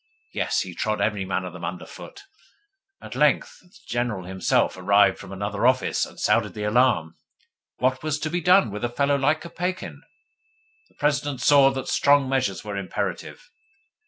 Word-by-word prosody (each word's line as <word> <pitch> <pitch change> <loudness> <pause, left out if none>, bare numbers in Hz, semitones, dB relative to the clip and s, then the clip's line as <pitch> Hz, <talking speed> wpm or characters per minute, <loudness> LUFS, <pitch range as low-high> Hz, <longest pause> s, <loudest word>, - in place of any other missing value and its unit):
Yes, - - 0
he 90 - -6
trod 110 +5 -2
every 105 -3 -1
man 95 0 -2
of 90 - -7
them 90 - -10
under 85 +1 -5
foot. 405 - -12 0.8
At - - -8
length - - +1
the 180 - -26
General 120 -5 -2
himself 95 -1 0
arrived 100 +1 +3
from - - -10
another 100 +4 -1
office, 130 0 +1
and - - -15
sounded - - +1
the 105 - -4
alarm. 105 -8 +2 0.6
What 130 +1 0
was 155 -1 -1
to 155 - -2
be 175 +1 -1
done 180 - +4
with 105 +2 -6
a 120 - 0
fellow 140 +3 +1
like 145 +3 +1
Kopeikin? 175 -2 -5 0.9
The - - -31
President 145 -2 -1
saw 140 -2 +6
that 135 -1 -5
strong 140 -1 +3
measures 130 -8 -1
were 105 -1 -5
imperative. 100 - -5
120 Hz, 170 wpm, -24 LUFS, 100-145 Hz, 0.9 s, saw